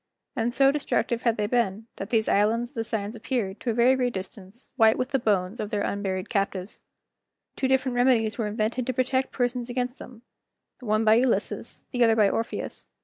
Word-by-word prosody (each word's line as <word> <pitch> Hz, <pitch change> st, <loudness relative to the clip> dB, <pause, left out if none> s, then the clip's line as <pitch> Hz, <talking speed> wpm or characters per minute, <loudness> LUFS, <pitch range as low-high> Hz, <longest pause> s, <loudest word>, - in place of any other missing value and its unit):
And 235 Hz, -1 st, 0 dB
so 270 Hz, +2 st, +4 dB
destructive 270 Hz, -4 st, -1 dB
had 235 Hz, -3 st, +1 dB
they 210 Hz, -, 0 dB
been, 220 Hz, -2 st, 0 dB
that 195 Hz, -, -6 dB
these 220 Hz, -2 st, +1 dB
islands 225 Hz, +4 st, +2 dB
of -, -, -30 dB
the 225 Hz, -, -2 dB
Sirens 220 Hz, -2 st, -3 dB
appeared, 225 Hz, -4 st, -3 dB
to 245 Hz, -, -3 dB
a -, -, +1 dB
very 245 Hz, +3 st, +5 dB
great 250 Hz, -2 st, 0 dB
distance, 190 Hz, +4 st, -9 dB
white 225 Hz, -3 st, +5 dB
with 255 Hz, -, -1 dB
the 270 Hz, -1 st, +1 dB
bones 205 Hz, -2 st, 0 dB
of 210 Hz, -, -3 dB
their 205 Hz, -1 st, -1 dB
unburied 195 Hz, -1 st, -2 dB
captives. 195 Hz, -2 st, -2 dB, 0.7 s
Two 265 Hz, -, 0 dB
different 265 Hz, -1 st, +1 dB
remedies 245 Hz, -3 st, +3 dB
were 225 Hz, -3 st, -2 dB
invented 220 Hz, +4 st, -2 dB
to 255 Hz, -, 0 dB
protect 260 Hz, +1 st, 0 dB
persons 245 Hz, -1 st, -1 dB
against 245 Hz, +1 st, -3 dB
them, 240 Hz, -2 st, -12 dB, 0.6 s
the 250 Hz, -, -11 dB
one 215 Hz, +1 st, +2 dB
by 215 Hz, -, +6 dB
Ulysses, 240 Hz, +1 st, 0 dB
the 245 Hz, -2 st, +2 dB
other 225 Hz, -1 st, +5 dB
by 215 Hz, -2 st, +5 dB
Orpheus. 230 Hz, -, -4 dB
230 Hz, 205 wpm, -26 LUFS, 210-250 Hz, 0.7 s, by